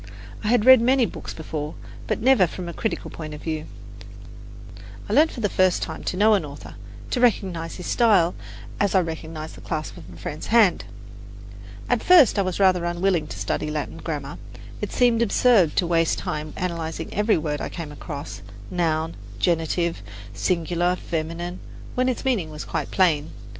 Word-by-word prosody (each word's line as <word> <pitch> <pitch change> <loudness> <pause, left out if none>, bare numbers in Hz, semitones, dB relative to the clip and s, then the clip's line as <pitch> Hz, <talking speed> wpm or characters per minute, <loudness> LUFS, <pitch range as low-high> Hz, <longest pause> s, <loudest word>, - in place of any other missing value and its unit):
I - - -2
had 235 -1 +3
read 260 -2 +9
many 255 +1 +4
books - - -7
before, 155 -1 -5 0.3
but - - -1
never 250 -8 +5
from 180 +2 -7
a 170 - -5
critical 220 - -3
point 155 -2 -7
of 150 - -11
view. 155 -1 -3 1.4
I - - -2
learned 315 +2 +5
for 240 - -7
the 210 - +2
first 185 -2 +2
time - - -6
to 180 - -2
know 215 +2 +5
an 195 -5 +2
author, 145 -1 -9 0.4
to 250 - 0
recognize 185 -8 +1
his 180 - -8
style 200 -8 +3 0.5
as 200 -1 +1
I - - +7
recognize 160 -1 -6
the - - -13
clasp 155 -1 -4
of 85 +2 -12
a 85 - -12
friend's 150 - -6
hand. 220 -5 +4 1.0
At - - +1
first 330 - +6
I - - +4
was 185 -1 -2
rather 185 -3 +4
unwilling 175 -2 0
to - - -8
study - - -2
Latin 150 -1 -4
grammar. 145 -3 -5 0.4
It - - -3
seemed 240 -2 +3
absurd 220 -6 +4
to 180 - +2
waste 165 -1 +2
time 150 0 -4
analyzing, 165 -2 -4
every 210 +2 +2
word 150 -2 -2
I - - -3
came 165 -4 -7
across 145 - -7 0.3
noun, 165 -2 0 0.2
genitive, 170 - 0 0.3
singular, 175 - 0
feminine 170 +1 -4 0.3
when 255 +1 +1
its 255 - -3
meaning 220 -12 0
was 150 -1 -7
quite - - -3
plain. 160 -6 +2
175 Hz, 175 wpm, -24 LUFS, 155-205 Hz, 1.4 s, read